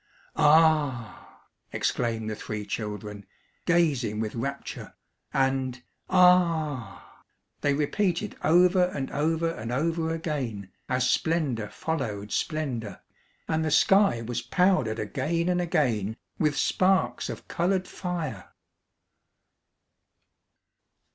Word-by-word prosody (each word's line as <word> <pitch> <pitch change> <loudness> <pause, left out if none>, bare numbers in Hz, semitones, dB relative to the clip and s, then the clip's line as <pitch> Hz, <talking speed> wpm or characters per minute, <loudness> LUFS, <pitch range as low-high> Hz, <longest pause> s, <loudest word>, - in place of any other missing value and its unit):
"A - - -2
a 150 -7 +3 0.4
h!" - - -9
exclaimed 115 -2 -1
the 110 - -3
three 105 0 -5
children, 105 0 -5 0.4
gazing 140 -11 +2
with 110 -1 -2
rapture. 140 +4 -5 0.4
And 130 -2 0 0.3
"A - - -2
a 165 -7 +3
h!" - - -23 0.4
they 145 -1 +2
repeated 180 +6 -1
over 180 +3 +5
and 140 -7 -4
over 165 +3 0
and 115 -6 -6
over 160 +4 0
again, 130 - -4 0.2
as 125 0 +1
splendour 130 -7 0
followed 110 -11 -4
splendour, 125 - -2 0.5
and 160 0 0
the 155 - 0
sky 190 - +4
was 120 +1 -3
powdered 130 - +2
again 150 - -1
and 180 0 +1
again 125 - 0 0.2
with 150 -2 +1
sparks 190 0 +1
of - - -7
coloured 185 +2 0
fire. 165 - -5
145 Hz, 110 wpm, -27 LUFS, 115-170 Hz, 0.5 s, over